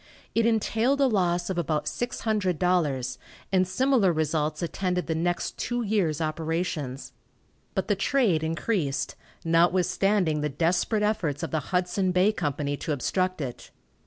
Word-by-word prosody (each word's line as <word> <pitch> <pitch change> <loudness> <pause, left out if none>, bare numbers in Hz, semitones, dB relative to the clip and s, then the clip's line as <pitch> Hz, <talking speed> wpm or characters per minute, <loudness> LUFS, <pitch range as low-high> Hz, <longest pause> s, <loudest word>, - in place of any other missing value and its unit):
It 230 0 +3
entailed 230 +4 +1
a 275 - +5
loss 180 -6 +1
of 180 - -1
about 155 -2 -1
$600, 180 - 0 0.3
and 185 -1 +3
similar 235 0 +3
results 155 0 -1
attended 180 +1 -1
the 165 - -1
next 175 +2 -2
two 240 0 -1
years' 195 -8 +1
operations, 155 -4 -3 0.6
but 190 - -1
the 205 - +2
trade 200 - +2
increased, 160 -3 -1 0.3
notwithstanding 175 0 +2
the 150 - 0
desperate 175 - +1
efforts 175 -8 0
of 160 - -3
the 160 - +1
Hudson 185 +1 +1
Bay 185 +3 +4
Company 145 -6 -2
to 155 - -2
obstruct 185 +5 -1
it. 125 -4 -6
180 Hz, 135 wpm, -26 LUFS, 155-200 Hz, 0.6 s, a